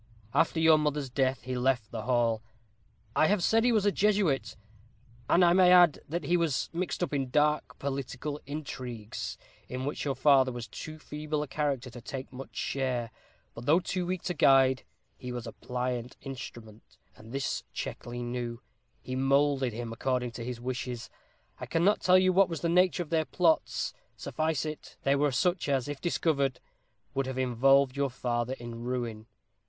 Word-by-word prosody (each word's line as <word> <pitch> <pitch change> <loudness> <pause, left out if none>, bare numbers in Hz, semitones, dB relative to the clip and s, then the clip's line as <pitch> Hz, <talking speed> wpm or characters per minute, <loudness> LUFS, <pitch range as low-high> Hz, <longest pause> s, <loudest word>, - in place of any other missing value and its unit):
After 160 - +2
your 160 -1 +6
mother's 150 -3 -1
death 130 0 0
he 130 0 -3
left 125 -3 0
the 115 - -4
hall. 120 -3 +2 0.7
I 155 - +5
have 200 -3 +2
said 225 0 +4
he 245 - +4
was 215 -3 +2
a 205 - +4
Jesuit, 190 - +1 0.7
and 175 +1 +6
I 170 - +5
may 180 -1 +6
add, 175 -4 +7
that 170 +3 -2
he 175 - +2
was 160 -6 0
mixed 180 +1 -2
up 155 - -2
in 135 -2 -1
dark 150 +2 +1
political 140 +1 -4
intrigues, 125 -7 -5 0.3
in 130 +1 -4
which 145 - -3
your 140 -2 -1
father 135 -1 +5
was 120 -1 -6
too 155 0 -8
feeble 150 0 -3
a - - -7
character 135 -3 -2
to 120 +1 -10
take 130 +2 -7
much 135 +1 -9
share. 125 -4 -2 0.4
But 120 - -9
though 160 +4 +6
too 180 -1 -3
weak 185 -1 -2
to 180 - -1
guide, 135 -4 +5 0.4
he 125 -1 -6
was 120 -1 -5
a 115 - -6
pliant 125 0 -4
instrument, 120 -5 -9 0.2
and 110 +1 -14
this 135 +1 -2
Checkley 120 0 -5
knew. 120 -1 -4 0.4
He 130 - -4
moulded 135 -1 +2
him 115 +1 -5
according 125 0 -1
to 115 0 -7
his 125 0 -5
wishes. 125 -1 -4 0.5
I - - -6
cannot 180 +6 +3
tell 185 0 +6
you 185 0 +4
what 195 0 +5
was 165 -4 -4
the 170 - 0
nature 180 +1 +3
of 160 - -17
their 160 -1 +2
plots. 165 -2 +1 0.2
Suffice 155 -1 -1
it, 155 -1 -7
they 140 0 +3
were 145 0 +2
such 175 +5 +1
as, 135 -2 +1
if 145 -2 -5
discovered, 140 -6 0 0.5
would 135 -1 -1
have 130 -1 -4
involved 130 +2 +3
your 140 0 +1
father 120 0 -2
in 120 -2 -8
ruin. 120 -3 -3
135 Hz, 180 wpm, -29 LUFS, 125-155 Hz, 0.7 s, add